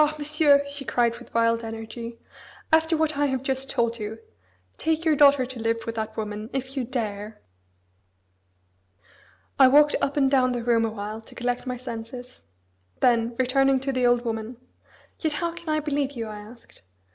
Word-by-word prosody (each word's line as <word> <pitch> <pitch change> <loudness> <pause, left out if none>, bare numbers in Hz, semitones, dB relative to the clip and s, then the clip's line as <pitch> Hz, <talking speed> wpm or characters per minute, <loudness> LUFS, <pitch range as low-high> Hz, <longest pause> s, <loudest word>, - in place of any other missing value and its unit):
Monsieur", 295 -1 +4
she 280 0 -6
cried 235 -2 +1
with 245 - -15
wild 230 0 +2
energy. 225 +1 -7 0.6
"After 320 0 +4
what 310 -2 0
I 290 - +3
have 265 -1 -2
just 270 0 -2
told 235 0 0
you, 215 +1 -5 0.6
take 320 +1 -1
your 315 -2 +4
daughter 280 -2 +6
to 255 -1 -8
live 230 0 -1
with 230 - -3
that 220 -1 -5
woman 215 0 -4
if 265 0 -4
you 265 - -1
dare." 215 -4 -4 2.2
I 265 - +9
walked 295 +3 +5
up 280 - -1
and 270 -2 +3
down 255 -2 +3
the 240 -1 -3
room 230 -1 +3
awhile 215 0 -5
to 225 - -17
collect 245 +1 -2
my 250 0 -2
senses. 245 +1 -8 0.6
Then, 235 -1 +2
returning 270 +1 +3
to 270 0 -1
the 255 -2 +2
old 240 0 +2
woman, 225 +1 -4 0.6
"Yet 315 -2 0
how 340 +2 -2
can 340 -1 -8
I 310 0 +2
believe 285 -2 -1
you?" 230 -4 -4
I 210 -1 -7
asked. 225 +3 -14
250 Hz, 175 wpm, -25 LUFS, 230-280 Hz, 2.2 s, I